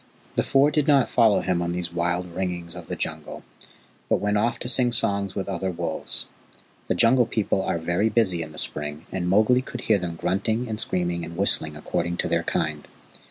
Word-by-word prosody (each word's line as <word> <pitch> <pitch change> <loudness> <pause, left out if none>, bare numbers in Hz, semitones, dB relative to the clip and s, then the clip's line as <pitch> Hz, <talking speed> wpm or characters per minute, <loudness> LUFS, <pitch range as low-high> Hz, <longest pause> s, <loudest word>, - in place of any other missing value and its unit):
The - - +1
Four 140 +2 +3
did 150 -1 +1
not 140 -4 +4
follow 110 -4 +4
him 90 -2 0
on 85 0 -2
these 90 -1 -3
wild 90 +1 -1
ringings 90 -2 -3
of - - -9
the - - -4
Jungle, - - -5 0.7
but - - +4
went 105 0 0
off 115 +3 +1
to - - -3
sing 125 -1 +3
songs 100 -4 +1
with 100 - -3
other 95 -1 -2
wolves. 85 -3 -2 0.6
The - - 0
Jungle 120 +1 +4
People 100 -3 0
are 90 - -1
very 85 +6 0
busy 100 -6 +1
in 80 -1 -6
the 75 - -13
spring, 75 +1 -5
and 90 -2 -2
Mowgli 110 +6 +4
could 125 -1 -7
hear 110 -4 +2
them 85 -2 -4
grunting 110 +8 -1
and 110 -1 -4
screaming 85 -3 -1
and 85 +1 -8
whistling 80 -5 +4
according 85 +3 -2
to - - -1
their - - +1
kind. 75 -1 -2
95 Hz, 205 wpm, -24 LUFS, 85-110 Hz, 0.7 s, not